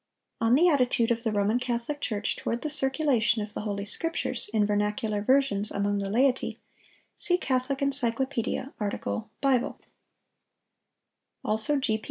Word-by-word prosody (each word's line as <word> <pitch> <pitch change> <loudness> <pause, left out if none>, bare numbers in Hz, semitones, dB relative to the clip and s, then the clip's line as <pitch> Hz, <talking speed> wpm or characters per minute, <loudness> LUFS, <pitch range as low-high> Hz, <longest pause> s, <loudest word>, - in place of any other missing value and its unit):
—On 230 +2 +4
the 340 +6 +5
attitude 250 -6 +2
of 230 0 0
the 225 -2 -1
Roman 210 +3 +1
Catholic 250 +4 -3
Church 210 -5 -1
toward 235 +2 -3
the 305 - -1
circulation 265 -6 +2
of 210 0 -9
the - - -4
Holy 200 -1 -3
Scriptures, 295 -2 -2
in 215 -2 +2
vernacular 210 +1 0
versions, 215 -4 +3
among 200 0 0
the 195 -1 -3
laity, 250 +4 +1 0.6
see 355 -2 +1
Catholic 260 -3 -1
Encyclopædia, 265 -1 0
art. 205 -2 -2 0.4
Bible; 270 -3 +1 1.7
also 220 +7 +2
G. 220 -5 0
235 Hz, 140 wpm, -27 LUFS, 210-270 Hz, 1.7 s, the